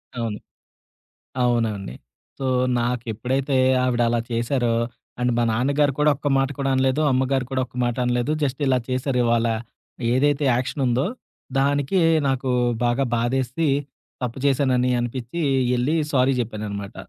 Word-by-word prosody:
అవును. 115 -3 -3 1.0
అవునండి. 110 - 0 0.4
సో 135 - -3 0.3
నాకెప్పుడైతే 125 +3 -1 0.3
ఆవిడలా 120 -2 +1
చేశారో 120 0 0 0.4
అండ్ 125 0 +1
మా 120 - +2
నాన్నగారు 140 +5 +1
కూడా 150 0 +4
ఒక్క 145 - -5
మాట 135 0 +1
కూడా 135 0 0
అనలేదు. 130 +3 +2
అమ్మగారు 130 0 +1
కూడా 130 -1 0
ఒక్క 125 - -23
మాట 120 -1 -1
అనలేదు. 125 +3 0
జస్ట్ 135 +1 -2
ఇలా 130 -1 +3
చేశారు 130 0 0
ఇవాళ. 115 0 +2 0.7
ఏదైతే 145 +3 +2
యాక్షనుందో, 130 0 0 0.5
దానికి 145 +6 +1 0.3
నాకు 130 -1 0 0.3
బాగా 120 +3 +1
బాధేసి 130 +6 0 0.6
తప్పు 125 +1 -3
చేశానని 130 -2 +2
అనిపిచ్చి 120 +6 -4 0.4
ఎళ్లి 130 +6 +1 0.2
సారీ 130 0 +3
జెప్పాననమాట. 105 -3 -4
125 Hz, 125 wpm, -23 LUFS, 120-135 Hz, 1.0 s, కూడా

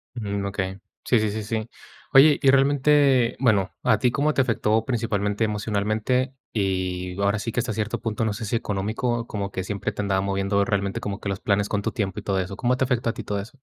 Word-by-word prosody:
Mm, 100 -4 -3
okey, 95 -1 -3 0.3
sí, 120 - +3
sí, 110 -1 0
sí, 110 +1 -3
sí. 110 +1 -3 0.4
Oye, 145 +2 +7
y 135 - +6
realmente, 135 -2 +4
bueno, 105 -7 +2
¿a 110 - +3
ti 125 +3 +2
cómo 145 +5 +1
te - - +2
afectó 110 -3 +1
principalmente 110 -4 -1
emocionalmente? 110 +5 0 0.2
Y 95 -2 -2
ahora 100 +1 +2
sí 115 +2 -4
que 125 - 0
hasta 115 -2 -2
cierto 110 0 -2
punto, 115 0 -2
no 110 - 0
sé 105 +2 -5
si 115 - 0
económico, 110 +4 -2
como 100 -3 -4
que 95 - -3
siempre 105 +2 -3
te 100 - -6
andaba 95 -1 +1
moviendo 100 +1 +1
realmente 100 -1 -1
como 100 0 -4
que - - -5
los 95 -1 -3
planes 100 0 +1
con 100 -1 -1
tu - - -2
tiempo 100 -6 -2
y - - -5
todo 95 -1 0
eso. 95 +1 -4
¿Cómo 125 0 +1
te 130 - +1
afectó 125 -2 0
a - - -2
ti - - -7
todo 105 - -3
eso? 115 +8 -11
105 Hz, 230 wpm, -24 LUFS, 100-120 Hz, 0.4 s, Oye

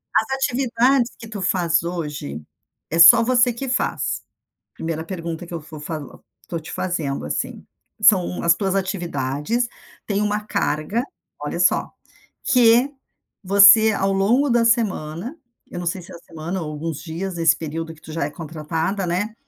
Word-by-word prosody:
As 220 0 +3
atividades 250 -1 +1
que 225 - -10
tu 210 -3 -6
faz 175 -4 +1
hoje, 150 - -5 0.5
é 165 - -2
só 230 +8 +10
você 245 0 +3
que 265 +4 -6
faz. 250 - -1 0.5
Primeira 160 -1 -4
pergunta 170 -2 -5
que 175 - -12
eu - - -2
vou 155 0 -11
falo 150 -1 -7 0.2
tô 165 -2 -3
te 160 - -10
fazendo, 160 -7 -2
assim, - - -4 0.3
são 190 -4 +4
as 170 0 +5
tuas 195 +1 -1
atividades. 175 - -2 0.4
Têm 205 0 0
uma 210 0 -1
carga, 200 +2 -1 0.4
olha - - -4
só, - - +2 0.5
que 245 +3 +4 0.5
você, 205 +3 +7
ao 195 0 0
longo 235 +9 +2
da 235 -1 +3
semana 220 - 0 0.3
eu 175 - -5
não 175 - -6
sei 180 +2 -1
se - - -13
a - - -9
semana 170 +3 -6
ou 155 - -5
alguns 150 0 -5
dias 175 +4 -5
nesse 165 -1 +3
período 160 +1 -5
que 155 - -21
tu 155 - -10
já 165 -3 -1
é 145 - -3
contratada, 165 +5 -3
né? 205 +6 -2
180 Hz, 165 wpm, -21 LUFS, 160-220 Hz, 0.5 s, só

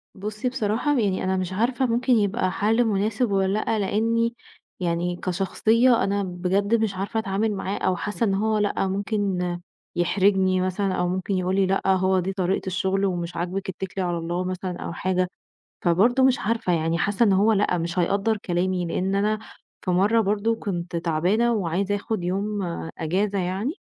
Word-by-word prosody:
بُصّي، 215 +5 -3
بصراحة 245 +3 0
يعني 195 -4 0
أنا 190 0 0
مش 185 0 -3
عارفة 240 +6 +1
ممكن 245 +2 +2
يبقى 205 -3 +1
حل 220 +5 +2
مناسب 215 +2 0
والّا 195 +1 +1
لأ، 220 0 0
لأني 230 +3 +1 0.4
يعني 175 0 -1
كشخصية 220 +7 +2
أنا 200 0 0
بجد 190 +4 0
مش 220 -3 0
عارفة 200 +4 -2
أتعامل 215 +1 0
معاه، 195 +1 -3
أو 185 - +1
حاسة 210 +6 -3
إن 200 - +2
هو 215 +2 +1
لأ 205 -2 0
ممكن 200 -1 -1 0.6
يحرجني 185 +1 +2
مثلًا 185 +1 -1
أو 180 -1 0
ممكن 185 +2 -2
يقول 185 +1 0
لي 195 0 +3
"لأ، 190 +1 +1
هو 190 0 +3
دي 190 +2 -2
طريقة 190 0 -1
الشغل 190 +1 0
ومش 175 -2 -2
عاجبك 185 +3 -3
اتكلي 190 +1 -4
على 175 -1 -1
الله." 170 +2 -2
مثلًا 185 0 -4
أو - - -5
حاجة، 185 +1 0 0.6
فبرضه 220 +10 +3
مش 260 -1 +4
عارفة 215 -4 0
يعني 165 0 0
حاسه 205 +6 +1
إن 200 - +4
هو 205 +4 +4
لأ 200 -4 +2
مش 170 +2 -3
حيقدّر 200 +4 +1
كلامي 180 -1 -1
لأن 185 +3 -1
أنا 210 +2 +1 0.5
في 185 - +1
مرة 205 +6 +3
برضه 210 +2 +1
كنت 175 -5 -4
تعبانة 180 +8 +1
وعايزة 195 0 0
آخد 205 -2 -3
يوم 200 +3 -1 0.4
إجازة 195 +5 0
يعني 190 - -2
195 Hz, 175 wpm, -24 LUFS, 185-215 Hz, 0.6 s, مش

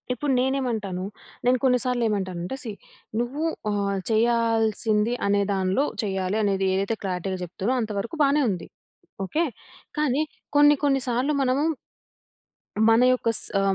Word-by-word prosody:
ఇప్పుడు 275 +3 -2
నేనేమంటాను. 240 -8 -1 0.4
నేను 250 +1 +4
కొన్ని 250 -2 +4
సార్లు 250 -1 0
ఏమంటానంటే 185 0 -3
సీ 230 - -4 0.5
నువ్వు 255 +6 -2 0.3
ఆ! - - 0 0.4
చేయాల్సింది 225 -1 +2
అనే 200 0 +3
దానిలో 190 +8 +1 0.2
చేయాలి 190 0 -1
అనేది 195 -1 +1
ఏదైతే 195 +4 0
క్లారిటీ‌గా 185 0 -2
చెప్తునో 190 +7 -2
అంత 220 -1 -3
వరకు 230 +10 -5
బానే 285 +1 +3
ఉంది. 180 -4 -4 0.6
ఓకే. 310 - 0 0.6
కానీ 295 -1 +2 0.3
కొన్ని 290 0 +7
కొన్ని 275 -1 +3
సార్లు 250 +5 +1
మనము... 265 +2 +2 1.3
మన 225 +1 +5
యొక్క 245 -2 0
స్ - - -3
ఆ! - - +2
225 Hz, 135 wpm, -25 LUFS, 195-260 Hz, 1.3 s, కొన్ని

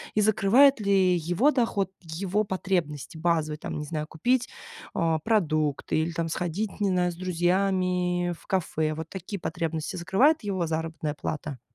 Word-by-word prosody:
И 215 - +4
закрывает 225 +6 +5
ли 195 -3 +3
его 175 - +2
доход 230 -8 0
его 185 +5 -1
потребности 175 -6 -2
базовые, 160 -2 0
там, - - -5
не 150 - -3
знаю, 150 0 -4
купить, 245 +11 +1 0.5
э, 165 -1 +1
продукты 155 -12 +1
или 160 +2 0
там 165 0 -2
сходить, 180 +6 -3
не 205 - +2
знаю, 180 -1 +1
с - - -10
друзьями 180 0 +1
в - - -21
кафе? 160 -4 0
Вот 160 +1 -6
такие 190 +2 -6
потребности 165 +1 -3
закрывает 245 - +3
его 190 -4 -1
заработная 160 -1 -3
плата? 145 -2 -5
175 Hz, 155 wpm, -27 LUFS, 160-195 Hz, 0.5 s, закрывает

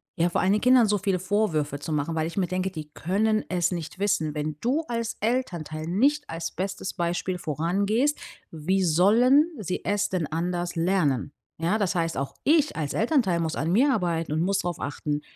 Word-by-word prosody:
ja 170 +1 +2
vor - - 0
allen 185 - +2
Dingen 210 +1 +2
Kindern 250 -1 +6
so 205 0 +1
viele 195 -1 0
Vorwürfe 175 -7 0
zu 160 +3 -6
machen, 150 +2 -1
weil 160 0 0
ich 170 - -8
mir 190 - +2
denke, 185 +1 -2
die 155 -5 -7
können 215 +5 0
es 175 -1 +1
nicht 170 -2 -5
wissen. 190 -7 0
Wenn 150 0 -3
du 270 +7 +1
als 230 -1 -3
Elternteil 175 - -2
nicht 280 - +1
als 165 0 -4
bestes 190 +1 -4
Beispiel 175 +1 -2
vorangehst, 200 - 0 0.3
wie 185 +5 0
sollen 225 - +5
sie 185 -4 -4
es 205 0 0
denn 175 -5 -1
anders 175 +2 -2
lernen? 165 -7 +1 0.3
Ja 170 +7 0
das 200 -2 0
heißt 165 -1 0
auch 140 +1 -3
ich 300 -1 +3
als 150 -3 -3
Elternteil 225 - +2
muss 160 -1 -1
an 160 +3 -1
mir 260 +9 +4
arbeiten 170 - -1
und 155 - 0
muss 195 +3 +1
darauf 175 -3 -3
achten: 145 +1 -3
180 Hz, 195 wpm, -26 LUFS, 160-210 Hz, 0.3 s, Kindern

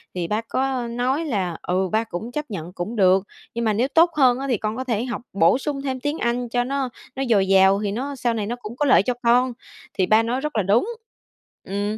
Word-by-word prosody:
thì 175 -2 -2
ba 210 +4 -1
có 255 +1 -2
nói 255 +7 -1
là 190 - -2
"Ừ, 185 +1 -1
ba 220 +1 +2
cũng 225 +3 -6
chấp 300 +2 -3
nhận 175 -1 -6
cũng 195 +6 -5
được, 190 -1 +4 0.3
nhưng 235 0 -2
mà 215 - +2
nếu 240 +6 +1
tốt 330 +4 +4
hơn 255 -2 +4
á 275 - -3
thì 240 - +2
con 215 +2 -3
có 260 - -2
thể 235 -3 -1
học 240 -3 -4
bổ 190 +5 +4
sung 275 0 -3
thêm 260 -2 -3
tiếng 290 +3 -2
Anh 240 0 -1
cho 245 +1 +1
nó 270 0 -2 0.3
nó 270 - -2
dồi 195 -4 +3
dào 195 +1 +5
thì 205 - -1
nó 275 +6 -4
sau 240 -2 0
này 215 -3 -2
nó 240 - -2
cũng 235 -2 -9
có 295 - +1
lợi 255 -7 +5
cho 250 - 0
con", 245 +1 +3 0.4
thì 185 - +1
ba 215 +4 +4
nói 245 +3 -1
rất 300 -2 -4
là 210 - +2
đúng. 215 - +2 0.7
Ừm, 205 +2 -3
235 Hz, 250 wpm, -22 LUFS, 200-260 Hz, 0.7 s, dào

